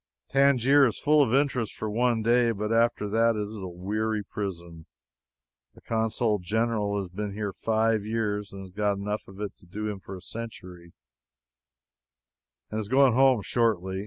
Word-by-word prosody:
Tangier 140 0 +5
is 115 - -3
full 150 0 +4
of 130 -6 +2
interest 130 -4 +1
for 110 - -4
one 115 +1 +1
day, 120 +1 +3
but 105 0 -2
after 115 -2 +2
that 115 +2 +2
it 105 - -1
is 105 0 -7
a 95 - -5
weary 105 +4 -2
prison. 85 -5 -6 0.9
The - - -17
Consul 110 -1 0
General 105 +1 -1
has 100 -2 -3
been 100 +3 -5
here 105 -2 -3
five 110 -1 +1
years, 105 -2 -2
and 95 0 -8
has 95 - -12
got 100 +1 0
enough 105 +2 -4
of 95 +1 -13
it 105 -1 -5
to 95 - -21
do 105 +4 -4
him 100 -2 -5
for 95 +1 -9
a 90 - -10
century, 90 -5 -9 1.8
and 110 - -2
is 105 -2 -5
going 135 -1 +5
home 130 -3 +4
shortly. 95 -6 0
105 Hz, 175 wpm, -27 LUFS, 100-115 Hz, 1.8 s, Tangier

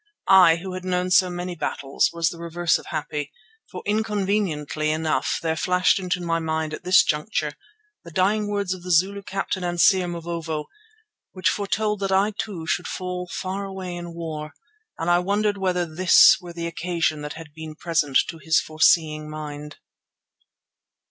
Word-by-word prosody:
I 185 -4 +7
who 185 +2 -6
had 185 0 -6
known 180 0 -1
so 185 0 +5
many 175 0 -4
battles, 140 -4 0
was 170 -1 0
the 170 - -9
reverse 170 0 0
of - - -14
happy, 150 -2 -4 0.4
for - - -8
inconveniently 200 -8 -1
enough 155 -3 0
there 160 -1 0
flashed 180 +4 +2
into 180 -1 -2
my 165 -1 0
mind 160 -1 -2
at - - -7
this 180 +1 +6
juncture 150 +9 -1 0.5
the - - -10
dying 200 +5 +1
words 200 -2 -1
of 185 - -9
the 180 - -8
Zulu 190 +4 +2
captain 195 -1 -3
and 175 -1 -2
seer, 185 0 +5
Mavovo, 165 -3 -4 0.7
which 185 -3 +1
foretold 210 +1 -1
that 195 -1 -2
I 195 +2 +3
too 200 -5 -5
should 175 - -1
fall 180 -1 -4
far 190 +2 -3
away 190 -2 -6
in 175 -1 -7
war; 155 -2 -6 0.4
and 165 - -3
I 175 0 +4
wondered 205 +2 0
whether 180 -2 0
this 170 +3 +6
were 175 -1 -9
the 170 0 -5
occasion 170 -2 -1
that 150 0 -5
had 160 -2 -11
been 160 0 -8
present 155 -5 +1
to 165 - -7
his 160 +2 +3
foreseeing 155 -1 +2
mind. 150 -1 -7
175 Hz, 170 wpm, -23 LUFS, 160-185 Hz, 0.7 s, I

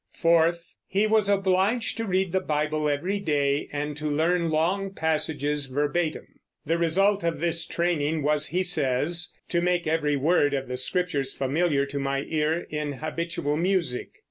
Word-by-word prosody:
Fourth, 170 0 +2
he 200 +3 +1
was 215 -2 +2
obliged 195 +4 +1
to 225 - -3
read 190 -1 0
the 190 - +2
Bible 155 -2 -1
every 175 +8 -1
day 145 -5 0
and 145 0 -3
to 150 0 -3
learn 165 +3 +1
long 180 +6 0
passages 150 -4 -1
verbatim. 150 +4 -1 0.4
The 165 +3 0
result 195 +4 +2
of 170 -1 -1
this 170 0 -1
training 160 -3 0
was, 150 +1 +2
he 180 +2 0
says, 170 +1 +1 0.2
"to 170 - +1
make 175 0 +1
every 155 -2 +1
word 145 0 +2
of 135 -1 -3
the 125 0 -4
Scriptures 140 -1 -1
familiar 140 +1 +1
to 140 0 -5
my 135 0 -1
ear 160 +2 0
in 150 -1 -2
habitual 155 0 -3
music." 170 -7 -1
160 Hz, 160 wpm, -26 LUFS, 145-180 Hz, 0.4 s, Fourth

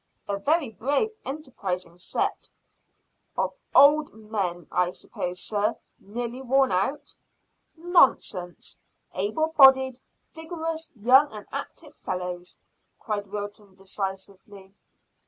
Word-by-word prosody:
"A 200 0 -2
very 295 +2 +1
brave, 285 - 0
enterprising 195 - -5
set." - - -2 0.9
"Of - - 0 0.2
old 295 +1 +6
men, 200 -6 -3
I 180 +1 +2
s'pose, 180 0 -5
sir, 210 +3 0 0.2
nearly 240 +4 -5
worn 265 0 +3
out?" 195 +11 -1 0.6
"Nonsense! 265 - +1 0.3
Able 215 +12 0
bodied, 265 -2 +7 0.3
vigorous, 325 0 -5
young 255 +7 +5
and 210 -1 -9
active 285 +2 -7
fellows," 180 -1 -5 0.4
cried 205 -3 -3
Wilton 205 -1 -7
decisively. 195 0 -7
215 Hz, 100 wpm, -26 LUFS, 190-275 Hz, 0.9 s, bodied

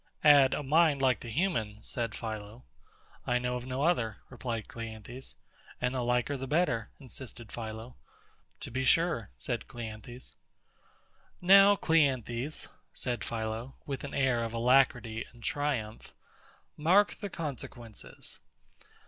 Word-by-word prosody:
Add, 140 -3 +7
a - - -3
mind 150 0 +4
like 130 -2 +3
the 120 - -8
human, 115 - 0
said 115 0 -3
PHILO. 110 +1 -6 0.6
I 125 - +3
know 125 0 -1
of 125 0 -5
no 130 +2 -1
other, 120 - +2
replied 120 -3 -4
CLEANTHES. 115 +3 -6 0.4
And 125 0 0
the 130 - -1
liker 125 +3 +1
the 135 0 -5
better, 130 -8 +1
insisted 125 -4 -8
PHILO. 110 +1 -6 0.7
To - - -6
be 130 +2 -1
sure, 165 - +3
said - - -3
CLEANTHES. 120 +1 -8 1.0
Now, 195 +2 +8
CLEANTHES, 135 - +1 0.3
said 120 -2 -1
PHILO, 115 +3 -4
with 140 -2 -4
an 140 - -5
air 130 -4 +2
of 115 0 -4
alacrity 120 -2 +3
and 120 -1 -16
triumph, 130 -7 -2 0.6
mark 185 +7 +4
the 205 - -6
consequences. 125 - -6
125 Hz, 130 wpm, -31 LUFS, 115-145 Hz, 1.0 s, Now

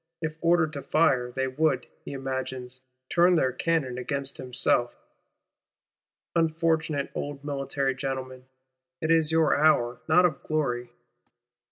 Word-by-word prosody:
If 160 -1 -3
ordered 170 -2 +3
to 140 - -5
fire, 130 -6 +2
they 130 +1 -1
would, 150 +4 0 0.2
he - - -7
imagines, 130 -1 -5 0.3
turn 175 +3 +4
their 130 -6 +2
cannon 130 -2 -1
against 140 +1 -3
himself. 125 -1 0 1.4
Unfortunate 160 -3 0
old 145 -1 -5
military 135 -1 -1
gentlemen, 130 -1 -5 0.5
it 160 - 0
is 160 -1 +4
your 160 -3 +3
hour, 125 -6 +3
not 180 +3 +6
of 160 -6 0
glory! 125 -6 -2
140 Hz, 125 wpm, -27 LUFS, 130-160 Hz, 1.4 s, not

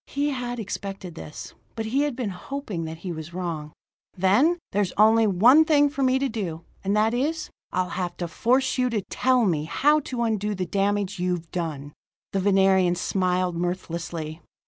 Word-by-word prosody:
He 290 +1 -1
had 245 -2 -3
expected 195 -3 -5
this; 155 -2 -9 0.2
but 225 - -3
he 255 +6 +1
had 290 -3 0
been 235 -5 -3
hoping 195 - -5
that 160 0 -6
he 180 - -2
was 160 +1 -7
wrong. 165 -5 -4 0.5
"Then 210 - +4
there's 200 -2 0
only 220 +1 +5
one 235 - +6
thing 290 -2 +4
for 280 - -4
me 260 0 +3
to 275 +1 0
do, 185 -9 -4 0.2
and 200 +2 +1
that 220 +2 +3
is: 305 +6 -1 0.2
I'll 185 0 0
have 180 -1 -3
to 175 - -3
force 255 +10 +1
you 250 0 +2
to 215 -4 -1
tell 255 -2 +3
me 155 -6 0
how 295 - +3
to 250 -4 -3
undo 210 -2 0
the 185 -1 -2
damage 200 +1 0
you've 175 -2 -2
done." 150 -5 -4 0.4
The 195 - 0
Venerian 190 -2 +4
smiled 180 -1 0
mirthlessly. 170 -2 -4
195 Hz, 180 wpm, -25 LUFS, 175-245 Hz, 0.5 s, one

